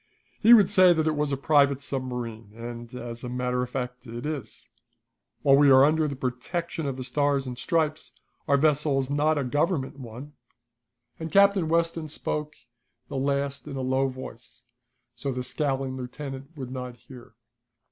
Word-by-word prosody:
He 230 +2 +8
would 205 -4 +5
say 185 -3 +7
that 160 -2 0
it 155 -1 +1
was 150 -1 0
a 140 - 0
private 140 -1 +3
submarine, 125 -6 -5
and, 120 0 -8
as 120 -1 -7
a 125 - -4
matter 125 0 -1
of 125 - -3
fact, 125 -1 -5
it 120 +3 -6
is. 145 -9 -6 0.8
While 140 -1 +6
we 145 0 +6
are 135 0 +8
under 155 +1 +2
the 140 - -4
protection 140 +6 -3
of 135 -2 -3
the 130 - -4
stars 140 +1 +1
and 125 -1 -5
stripes, 155 +3 -1 0.4
our 140 - +4
vessel 150 -1 +2
is 135 0 -1
not 150 +2 +2
a 145 - 0
Government 145 +1 -1
one," 130 +4 -9 0.9
and 160 -1 -5
Captain 200 -2 +4
Weston 165 -1 0
spoke 150 0 -3 0.5
the - - -6
last 140 +1 -1
in 140 - -6
a 135 - -3
low 130 +1 +1
voice, 130 -3 -10 0.5
so 140 - -4
the 125 0 -3
scowling 135 -1 -1
lieutenant 135 +3 -7
could 130 -4 -7
not 125 -1 -6
hear. 120 -2 -14
135 Hz, 175 wpm, -26 LUFS, 125-150 Hz, 0.9 s, He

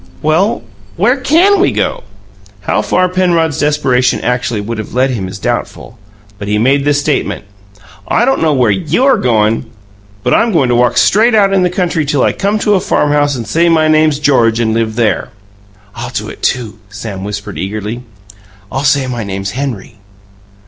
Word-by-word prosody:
"Well, 160 - +1 0.3
where 215 +8 +2
CAN 330 +10 +3
we 380 - +3
go?" - - -2 0.6
How - - 0
far 185 0 +1
Penrod's 175 -5 0
desperation 135 -4 +1
actually 125 -3 -1
would 110 +2 -5
have 110 - -7
led 130 +1 +2
him 100 -7 -3
is 95 - -7
doubtful; 115 +1 -4 0.4
but 100 - -6
he 105 +1 0
made 135 +5 +2
this 145 0 +2
statement: 145 -7 -2 0.6
"I 240 - +2
don't 270 +1 +1
know 160 -1 +2
where 125 -5 +2
YOU'RE 200 - +2
goin', 115 - +1 0.6
but 125 - +1
I'M 230 -2 +2
goin' 140 -7 +2
to 120 - +2
walk 120 0 +2
straight 220 +3 +4
out 200 -2 +3
in 190 - +3
the 180 - +2
country 175 -3 -1
till 140 -2 0
I - - +2
come 200 +2 -1
to 210 - +3
a 195 - +3
farmhouse 145 -3 +1
and 120 -3 -5
say 170 +6 +1
my 160 -1 +3
name's 155 -1 +3
George 120 -6 +2
and 110 -2 0
live 110 -1 -1
there!" 115 -2 0 0.6
"I'll - - -6
do - - -4
it, - - -11
too," 115 -4 -2
Sam 100 -1 -7
whispered 105 0 -6
eagerly. 105 +4 -4 0.7
"I'll 135 +2 -2
say 140 -1 +2
my 120 -3 -4
name's 95 -1 -4
Henry." 120 -4 -5
135 Hz, 185 wpm, -13 LUFS, 115-170 Hz, 0.7 s, straight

